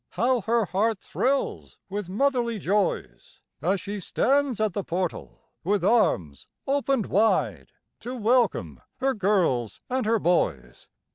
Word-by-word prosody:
How 240 +5 +1
her 230 +2 +1
heart 210 +4 0
thrills 270 +2 -2
with 200 -1 -5
motherly 235 +1 0
joys, 200 0 -2 0.2
As 185 +5 +1
she 205 +2 -5
stands 270 +5 +1
at 215 -3 +1
the 200 - -2
portal, 180 0 -4
with 200 +4 0
arms 90 - +1 0.2
opened 275 -4 +1
wide, 185 - +1 0.3
To 250 +3 -6
welcome 215 - +1
her 270 +1 0
girls 180 - +1
and 255 -4 0
her 225 +1 +3
boys. 70 - -1
210 Hz, 130 wpm, -25 LUFS, 180-240 Hz, 0.3 s, her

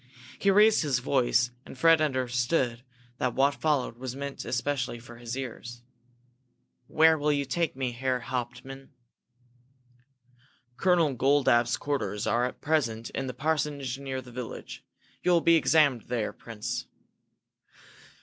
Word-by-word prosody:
He 200 - +2
raised 210 +2 +5
his 145 -6 +1
voice, 125 -1 +1
and - - -12
Fred 165 +2 +5
understood 125 -2 0 0.4
that 125 -4 -1
what 140 +1 +3
followed 140 -6 -1
was 130 -1 -5
meant 140 0 -6
especially 125 0 -2
for 120 0 -13
his 120 +1 -6
ears. 120 -2 -7 1.0
"Where 160 0 +4
will 150 +1 +2
you 140 -1 0
take 160 +3 -1
me, 130 -2 -2
Herr 130 +1 -1
Hauptmann?" 130 +2 -6 1.9
"Colonel 170 -3 +2
Goldapp's 125 -2 +3
quarters 135 -7 -2
are 120 +1 +2
at 125 - -6
present 120 -8 -1
in 135 - -3
the 125 - -5
parsonage 140 -2 -1
near 130 -1 -5
the 125 - -13
village. 120 -1 -7 0.4
You - - 0
will 170 - +4
be 170 - +4
examined 150 -7 +3
there, 120 -3 -2
Prince. 110 -3 -6
130 Hz, 135 wpm, -28 LUFS, 120-145 Hz, 1.9 s, raised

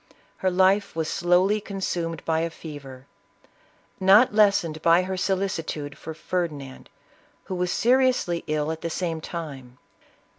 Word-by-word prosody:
Her 190 - +1
life 190 +2 +2
was 160 -1 -1
slowly 180 +6 +2
con 200 -1 -7
sumed 165 -4 -3
by 160 -1 +1
a 165 +1 -1
fever, 140 -5 -10 0.9
not 200 +5 +6
lessened 200 -7 +3
by 170 +2 +4
her 190 +1 -3
solicitude 185 -6 -2
for 160 +2 -8
Ferdinand, 155 -6 -4 0.5
who - - -6
was 180 -1 -1
seriously 250 -8 +2
ill 155 0 -1
at 160 - -6
the 170 - -3
same 165 -1 -3
time. 140 -8 -7
170 Hz, 140 wpm, -25 LUFS, 155-190 Hz, 0.9 s, not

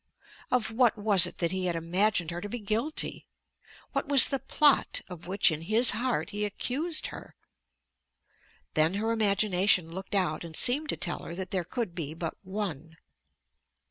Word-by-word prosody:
Of 245 -3 0
what 235 0 +2
was 205 -4 +5
it - - -10
that 170 -1 -1
he 185 -1 -2
had 175 - -1
imagined 175 +1 0
her 175 +1 -5
to 205 - -6
be 245 - -4
guilty? 225 +8 -2 0.6
What - - -2
was 280 -2 +8
the 275 - -1
plot 285 +2 +2
of 175 -2 -10
which 190 -1 +3
in 155 0 -4
his 220 +7 +2
heart 245 +1 -2
he 210 0 -2
accused 280 - -1
her? - - -11 1.4
Then 160 +4 +3
her 220 +3 -1
imagination 200 -4 +2
looked 190 +5 -6
out 180 -5 0
and 165 -2 -8
seemed 290 - +2
to - - -1
tell 175 - -3
her 170 - -8
that 190 0 -6
there 185 -2 -1
could 215 +1 -4
be 160 -3 -5
but 165 -1 -5
one. 180 -6 -6
195 Hz, 175 wpm, -28 LUFS, 170-225 Hz, 1.4 s, was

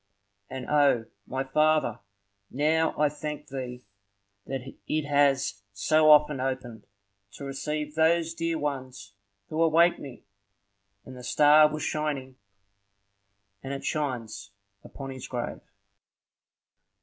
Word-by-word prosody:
And 130 -1 -6
O, 145 -6 +3 0.2
my 130 +1 -2
Father, 150 -3 +2 0.5
now 160 +4 +1
I 150 - +5
thank 150 0 -6
thee 125 -2 -6 0.6
that 135 -1 -3 0.3
it 155 -1 -1
has 140 -7 +2
so 155 +10 +3
often 150 -2 +6
opened, 130 -4 -4 0.5
to 140 - -8
receive 150 +2 -4
those 165 +1 +2
dear 165 0 -2
ones 130 -9 -5 0.4
who 155 - -1
await 165 +1 +4
me!" 135 -4 -10 0.8
And 130 - -10
the 125 - -10
star 150 +4 +5
was 155 0 -4
shining; 145 -4 -3 1.3
and 135 - -5
it 140 - -6
shines 120 -9 -3 0.3
upon 135 -1 -8
his 130 -1 -8
grave. 120 -2 -4
145 Hz, 115 wpm, -27 LUFS, 130-155 Hz, 1.3 s, often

